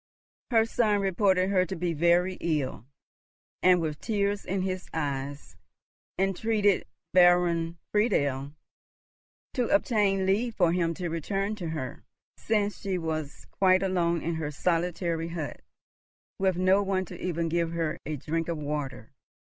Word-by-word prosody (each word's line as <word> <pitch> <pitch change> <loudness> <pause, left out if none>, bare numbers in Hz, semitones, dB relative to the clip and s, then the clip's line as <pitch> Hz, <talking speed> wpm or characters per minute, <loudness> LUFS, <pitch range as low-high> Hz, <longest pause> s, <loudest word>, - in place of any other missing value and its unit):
Her 225 -2 +4
son 220 -3 +2
reported 190 -1 +2
her 185 -2 +4
to 190 +1 -4
be 175 0 -1
very 175 +3 +2
ill, 150 -7 -2 0.7
and 180 -1 +5
with 155 -3 -3
tears 205 -2 0
in 190 0 -1
his 185 -1 -3
eyes 140 - -4 0.6
entreated 200 +1 +1 0.3
Baron 175 -2 +4
Friedel 145 - +1 1.0
to 245 -2 0
obtain 210 -10 +2
leave 220 +5 +1
for 175 -3 +3
him 170 -1 0
to 180 0 -3
return 195 +6 -2
to 175 -5 -4
her, 145 -6 -5 0.3
since 210 -2 -1
she 195 -2 -1
was 155 -3 -4
quite 185 -1 +3
alone 170 -3 +1
in 170 - -1
her 160 -2 -3
solitary 170 +1 -1
hut, 165 -3 -5 0.8
with 190 -2 +1
no 185 +2 +4
one 190 -1 0
even 170 -2 -2
to - - -1
give 170 -1 0
her 165 -2 -2
a 155 - -3
drink 160 +4 -2
of 170 -1 -2
water. 145 -6 -4
175 Hz, 140 wpm, -28 LUFS, 160-195 Hz, 1.0 s, and